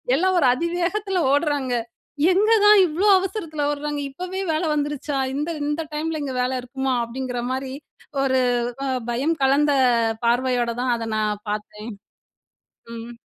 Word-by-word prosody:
எல்லா 370 Hz, +6 st, +2 dB
ஒரு 270 Hz, -, +4 dB
அதிவேகத்துல 355 Hz, +5 st, -1 dB
ஓடுறாங்க. 285 Hz, -4 st, 0 dB, 0.6 s
எங்க 425 Hz, +4 st, +3 dB
தான் 420 Hz, 0 st, +8 dB
இவ்ளோ 345 Hz, +7 st, 0 dB
அவசரத்துல 335 Hz, -6 st, -3 dB
ஓட்றாங்க 295 Hz, 0 st, -3 dB
இப்போவே 365 Hz, +6 st, -5 dB
வேல 310 Hz, -, -1 dB
வந்துருச்சா? 290 Hz, -1 st, -2 dB, 0.2 s
இந்த 295 Hz, +4 st, -2 dB, 0.2 s
இந்த 295 Hz, +2 st, -1 dB
டைம்ல 310 Hz, 0 st, -2 dB
இங்க 265 Hz, -2 st, -4 dB
வேல 250 Hz, +1 st, 0 dB
இருக்குமா? 265 Hz, +1 st, -2 dB
அப்டிங்குற 250 Hz, 0 st, -4 dB
மாரி 260 Hz, 0 st, -3 dB, 0.5 s
ஒரு 260 Hz, -1 st, +2 dB, 0.4 s
அ -, -, -1 dB, 0.2 s
பயம் 280 Hz, +8 st, 0 dB
கலந்த 285 Hz, +2 st, +3 dB, 0.5 s
பார்வையோட 245 Hz, 0 st, +1 dB
தான் 250 Hz, -1 st, +1 dB
அத 225 Hz, -1 st, -5 dB
நான் 210 Hz, -1 st, -1 dB
பாத்தேன், 210 Hz, +2 st, -5 dB, 1.0 s
ம். 230 Hz, +1 st, -9 dB
285 Hz, 135 wpm, -23 LUFS, 255-330 Hz, 1.0 s, தான்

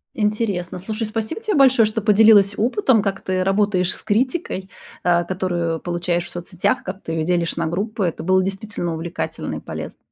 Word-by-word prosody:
Интересно, 210 Hz, -5 st, -1 dB
слушай, 215 Hz, +4 st, -3 dB
спасибо 220 Hz, -, -4 dB
тебе 430 Hz, -4 st, -1 dB
большое, 260 Hz, -5 st, +6 dB
что 215 Hz, +1 st, -2 dB
поделилась 205 Hz, -1 st, +6 dB
опытом, 245 Hz, -, +2 dB
как 195 Hz, -1 st, -2 dB
ты 185 Hz, 0 st, -1 dB
работаешь 195 Hz, -1 st, +1 dB
с -, -, -7 dB
критикой, 225 Hz, -, -1 dB, 0.3 s
а, 175 Hz, -1 st, +3 dB
которую 175 Hz, -3 st, -2 dB
получаешь 175 Hz, 0 st, -2 dB
в -, -, -9 dB
соцсетях, 175 Hz, +1 st, -1 dB
как 190 Hz, +1 st, -7 dB
ты 165 Hz, -, -5 dB
ее 160 Hz, -1 st, -1 dB
делишь 170 Hz, -1 st, 0 dB
на 165 Hz, -1 st, -1 dB
группы. 200 Hz, +4 st, -2 dB
Это 165 Hz, -2 st, -3 dB
было 185 Hz, +1 st, +3 dB
действительно 195 Hz, -2 st, -3 dB
увлекательно 165 Hz, +2 st, -4 dB
и -, -, -5 dB
полезно. -, -, -7 dB
195 Hz, 180 wpm, -21 LUFS, 175-215 Hz, 0.3 s, большое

